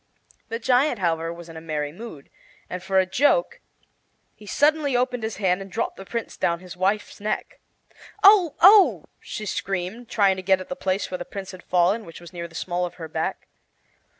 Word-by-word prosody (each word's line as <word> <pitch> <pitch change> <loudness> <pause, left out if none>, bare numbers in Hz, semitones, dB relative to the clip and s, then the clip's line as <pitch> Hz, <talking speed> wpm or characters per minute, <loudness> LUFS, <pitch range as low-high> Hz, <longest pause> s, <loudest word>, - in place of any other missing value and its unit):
The 230 - -2
giant, 250 +3 +2
however, 165 -3 0
was 170 0 -10
in 165 - -11
a 160 - -8
merry 150 -2 -3
mood, 175 -5 -10 0.4
and 180 - -4
for 190 +1 -1
a 190 - +5
joke 295 - +2 0.7
he 210 - -16
suddenly 290 +2 +2
opened 250 -1 0
his 220 -1 -4
hand 190 -2 +1
and 195 0 -9
dropped 225 - -2
the 195 - -10
Prince 235 -1 -5
down 170 0 0
his 180 -1 -10
wife's 195 +3 -1
neck. 210 +1 -3 0.6
"Oh, 385 -7 +7
oh!" 395 +1 +7
she 215 - -6
screamed, 195 +4 -3
trying 195 -3 +3
to - - -4
get 190 0 +3
at 185 - -9
the 270 - -3
place 190 -7 -2
where 180 - -3
the - - -3
Prince 195 +1 -7
had 185 -1 -11
fallen, 180 +6 +2
which 165 -4 -11
was 175 +1 -13
near 170 -1 -5
the 165 - -18
small 175 +1 -2
of 175 - -4
her 165 -2 -7
back. 160 +1 -3
190 Hz, 205 wpm, -24 LUFS, 175-235 Hz, 0.7 s, Oh